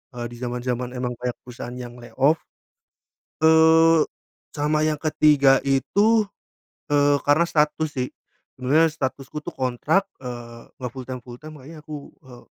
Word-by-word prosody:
Eee, 120 - -4
di - - -9
zaman 125 0 -4
zaman 125 0 -2
emang 125 0 -2
kayak 125 -1 -3
perusahaan 125 0 -8
yang 120 -1 -8
lay 120 -1 -12
off. 145 +5 +3 1.0
Eee, 160 0 +6 0.5
sama 150 +1 +1
yang 155 - +1
ke-3 150 -3 +4
itu, 210 +11 +3 0.7
eee, 145 0 +4
karena 150 +4 +4
status, 155 +1 +1
sih, 125 0 -1 0.5
sebenarnya 150 +6 +3
statusku, 135 -1 -4
tuh, - - -6
kontrak, 145 +10 0 0.2
eee, 120 -1 -9
nggak 125 -2 -5
full-time 130 0 -6
full-time, 130 +6 -11
makanya 155 +4 -11
aku, 150 -2 -8 0.2
eee, 125 -2 -14
135 Hz, 145 wpm, -23 LUFS, 125-155 Hz, 1.0 s, Eee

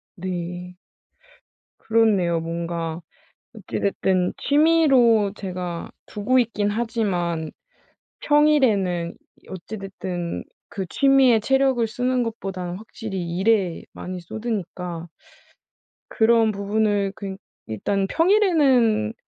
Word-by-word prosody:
네. 180 -1 -5 1.0
그렇네요. 205 -7 +2
뭔가 165 0 -4 0.5
어찌 210 -5 -5
됐든 190 -2 +1
취미로 275 -9 +4
제가 180 -4 -5 0.2
두고 215 +5 +1
있긴 215 -4 +1
하지만 190 -8 -1 0.7
평일에는 220 - +2 0.4
어찌 190 +3 -7
됐든 180 -3 -5 0.2
그 195 -2 -5
취미에 270 -2 +4
체력을 265 0 +2
쓰는 250 +2 0
것보다는 190 -6 -4
확실히 195 -5 -6
일에 195 -4 +1
많이 180 0 -7
쏟으니까 180 -4 -5 1.0
그런 225 0 +3
부분을 205 0 0
그니 195 -2 -6 0.3
일단 195 - -1
평일에는 275 - +3
205 Hz, 210 characters per minute, -23 LUFS, 180-235 Hz, 1.0 s, 취미로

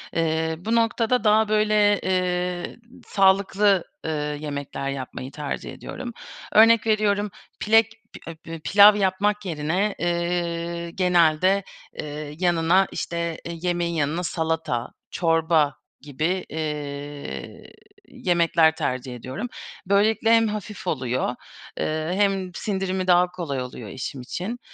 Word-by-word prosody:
Eee, 160 0 0
bu 225 +6 -1
noktada 230 +1 +2
daha, 215 0 +4
böyle, 210 -1 +3
eee, 180 0 -1 0.3
sağlıklı, 195 0 +3 0.2
ııı, 150 -2 -2
yemekler 145 -2 -5
yapmayı 130 -1 -6
tercih 145 -1 -5
ediyorum. 250 -2 -7 0.4
Örnek 225 0 +6
veriyorum, 210 -1 +1 0.3
pilek 225 +1 +4 0.2
pi - - -9
e 165 - -11
bö 165 -1 -7
pilav 205 +5 +7
yapmak 205 +1 0
yerine, 175 +5 -1
eee, 170 0 -2
genelde, 180 +1 +3 0.4
eee, 150 0 -6
yanına, 175 +1 +3
işte, 170 -1 -3
eee, 170 0 -5
yemeğin 175 -1 -1
yanına 160 +2 -1
salata, 160 -8 -2 0.2
çorba 165 -3 +2 0.3
gibi, 155 +7 -2
eee, 145 - -6 0.4
yemekler 170 -2 +2
tercih 130 -3 -3
ediyorum. 130 - -5 0.4
Böylelikle 215 +3 +3
hem 225 -1 +5
hafif 210 -2 -6
oluyor, 125 -4 -1 0.4
eee, 155 +2 -1
hem 195 -2 +1
sindirimi 190 -1 -2
daha 180 0 +4
kolay 160 -8 -4
oluyor 125 -3 -7
eşim 130 +2 -6
için. 195 - -5
175 Hz, 115 wpm, -24 LUFS, 155-200 Hz, 0.4 s, pilav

